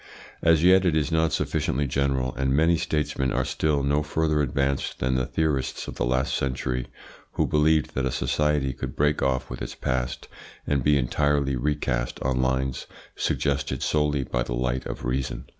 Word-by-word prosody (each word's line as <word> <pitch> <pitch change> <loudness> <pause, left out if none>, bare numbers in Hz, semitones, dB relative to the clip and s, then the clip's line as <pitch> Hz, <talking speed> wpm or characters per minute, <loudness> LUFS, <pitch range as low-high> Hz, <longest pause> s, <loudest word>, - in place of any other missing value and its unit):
As 80 -1 +4
yet 95 +1 +6
it 85 -4 +2
is 80 +1 0
not 80 -1 +2
sufficiently 70 0 0
general, 65 -1 0
and 65 0 -1
many 80 +3 +4
statesmen 75 -4 -1
are - - 0
still 75 -3 0
no 70 +2 +2
further 75 0 0
advanced 70 0 -1
than 65 +1 0
the 65 -1 0
theorists 75 -5 -1
of - - -5
the - - 0
last 65 +2 0
century, 65 -1 -2 0.5
who - - +1
believed 75 -2 +2
that 65 0 0
a - - -2
society 75 -2 0
could - - -6
break 75 0 +1
off 65 -1 0
with - - -6
its - - -5
past 65 -1 -2 0.4
and 70 -3 0
be 75 +1 +4
entirely 70 +1 +1
recast 60 -3 -1
on 65 -1 +1
lines 65 0 -1 0.3
suggested 70 -1 -1
solely 75 -2 +1
by 60 -1 -2
the - - -2
light 65 +1 -1
of - - -6
reason. 65 -1 -2
70 Hz, 175 wpm, -25 LUFS, 65-75 Hz, 0.5 s, yet